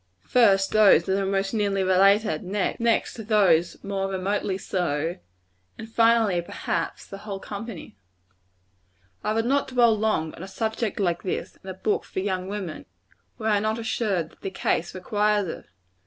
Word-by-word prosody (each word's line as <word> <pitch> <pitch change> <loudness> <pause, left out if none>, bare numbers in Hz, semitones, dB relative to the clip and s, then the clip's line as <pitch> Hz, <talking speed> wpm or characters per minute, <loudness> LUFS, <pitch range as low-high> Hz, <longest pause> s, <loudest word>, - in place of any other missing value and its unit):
First, 195 -6 +4
those 200 -5 +5
most 195 +1 0
nearly 200 -3 +1
related; 195 +4 +3
next, 215 +3 -1
those 180 -6 +3
more 195 -1 -2
remotely 195 0 -1
so; 170 -3 -2 0.6
and 225 - -8
finally, 225 -5 +3
perhaps, 170 -1 -4
the 195 - -9
whole 200 -2 -6
company. 200 - -8 1.3
I - - 0
would 225 +1 0
not 275 +3 +1
dwell 240 -3 +4
long 210 -7 0
on - - -11
a 190 - -6
subject 220 +2 -3
like 175 -3 0
this, 185 - -4
in 190 - -8
a 185 - -5
book 205 +2 -1
for - - -5
young 185 -1 -2
women, 195 -5 -6 0.5
were 220 -1 -2
I 205 -1 +3
not 215 +2 -1
assured 215 -7 -1
that - - -24
the 195 - -3
case 175 -2 -1
requires 205 +1 +1
it. - - -7
200 Hz, 155 wpm, -25 LUFS, 185-220 Hz, 1.3 s, those